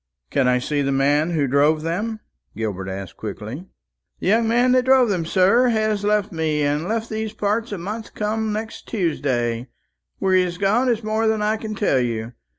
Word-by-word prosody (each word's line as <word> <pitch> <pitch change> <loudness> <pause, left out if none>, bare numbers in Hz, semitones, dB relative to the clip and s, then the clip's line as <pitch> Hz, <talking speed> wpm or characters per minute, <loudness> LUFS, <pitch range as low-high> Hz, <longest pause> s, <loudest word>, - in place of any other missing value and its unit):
"Can 135 -3 +2
I 125 0 +4
see 145 +3 -1
the 140 0 0
man 145 +4 +2
who 160 -4 +1
drove 145 +4 +2
them?" 210 +7 -2 0.4
Gilbert 100 -4 -3
asked 95 -1 -7
quickly. 110 - -7 0.5
"The - - -3
young 225 +2 +3
man 245 +2 +3
that 255 0 +3
drove 260 -2 +5
them, 175 -5 -1
sir, 195 +8 +4
has 215 -3 +1
left 210 0 +1
me, 155 -3 0
and 145 +1 +1
has 175 - -5
left 225 +1 -2
these 220 0 -3
parts 215 +3 -1
a 205 - -3
month 210 +5 -6
come 220 +1 -1
next 220 +1 -5
Tuesday. 130 - -1 0.5
Where 190 - +1
he 185 - +5
has 180 -1 -2
gone 215 +7 +2
is 230 -2 0
more 220 +1 0
than 220 -1 +1
I 215 +1 +2
can 220 -1 -5
tell 195 -11 +2
you. 115 -1 -2
190 Hz, 200 wpm, -22 LUFS, 145-220 Hz, 0.5 s, drove